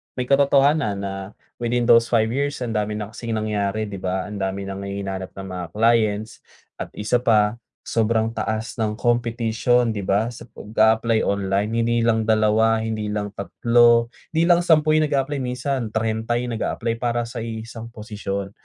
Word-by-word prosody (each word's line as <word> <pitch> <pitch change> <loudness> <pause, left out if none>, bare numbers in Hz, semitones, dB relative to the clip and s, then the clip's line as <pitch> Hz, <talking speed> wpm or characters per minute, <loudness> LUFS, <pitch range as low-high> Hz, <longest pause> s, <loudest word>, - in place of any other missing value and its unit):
may 125 - -1
katotohanan 140 -5 +3
na 95 0 -6 0.2
within 120 0 0
those 115 -1 +5
5 110 -1 +2
years, 140 +1 -2
ang 120 - -3
dami 105 -1 -1
na 105 0 -5
kasing 115 0 -4
nangyari, 105 -1 -1
‘di 100 -2 -6
ba, 95 0 -2
ang 105 +1 -7
dami 95 0 -2
nang 100 0 -6
hihinanap 95 -1 -5
ng 95 0 -7
mga 90 -1 -4
clients. 110 -1 +1 0.4
At - - -4
isa 105 +4 +1
pa, 110 -2 +2 0.2
sobrang 110 0 +1
taas 110 +1 -3
ng 110 -2 0
competition, 120 0 +1
'di 100 - -3
ba, 100 +4 +1
sa 120 - -10
pag-a-apply 110 +1 +2
online. 100 +1 0
Hindi 120 0 +1
lang 110 -1 +2
2, 110 +1 +3
hindi 110 -1 -3
lang 105 -1 -3
3, 115 +4 +3 0.2
hindi 160 - +3
lang 175 -1 +5
10 155 -3 +4
yung 155 0 +3
nag-a-apply. 140 0 0
Minsan 125 0 -2
30 110 +1 -1
yung 120 0 -3
nag-a-apply 115 +1 -2
para 120 -1 0
sa 115 +1 -7
iisang 115 0 -6
posisyon. 105 -3 -5
110 Hz, 165 wpm, -22 LUFS, 105-120 Hz, 0.4 s, those